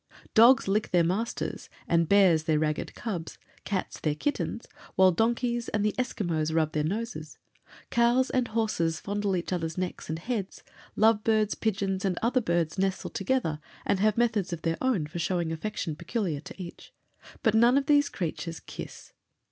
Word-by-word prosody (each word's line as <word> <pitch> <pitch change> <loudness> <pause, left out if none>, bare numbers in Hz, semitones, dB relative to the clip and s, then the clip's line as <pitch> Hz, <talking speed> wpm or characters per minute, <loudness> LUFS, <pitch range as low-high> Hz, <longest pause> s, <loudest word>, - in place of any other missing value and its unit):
Dogs 235 +1 +6
lick 205 +2 +1
their 175 -2 +4
masters 200 +8 -2 0.2
and 170 -1 +2
bears 185 -6 +5
their 160 -2 +2
ragged 155 0 -1
cubs; 180 -8 -5 0.3
cats 195 -3 -3
their 150 -2 0
kittens, 290 - -2 0.3
while 190 0 +6
donkeys 235 +4 0
and 210 -1 0
the 210 - +1
Esquimaux 170 -11 -1
rub 160 -1 +1
their 150 -1 0
noses; 185 -3 -4 0.5
cows 240 +2 +3
and 255 -2 +1
horses 210 -8 0
fondle 205 -1 -1
each 175 +1 -2
others' 165 -1 -3
necks 185 -3 -4
and 160 - -2
heads; 205 +1 -4 0.3
love 215 0 +4
birds, 215 -2 +2
pigeons, 195 -3 -1
and 185 -3 0
other 250 +2 +2
birds, 170 -2 0
nestle 190 0 -1
together 195 -7 -1 0.3
and 200 - +1
have 215 +1 +2
methods 225 -6 +1
of 170 -2 -5
their 165 0 0
own 245 -12 +1
of 170 +3 -5
showing 175 -1 -1
affection 165 -2 -3
peculiar 170 -2 -2
to 150 - -11
each; 175 -2 -9 0.5
but 220 -4 +3
none 235 +4 +5
of 280 - +1
these 290 0 +4
creatures 165 -1 -4
kiss. - - -10
195 Hz, 170 wpm, -28 LUFS, 165-225 Hz, 0.5 s, Dogs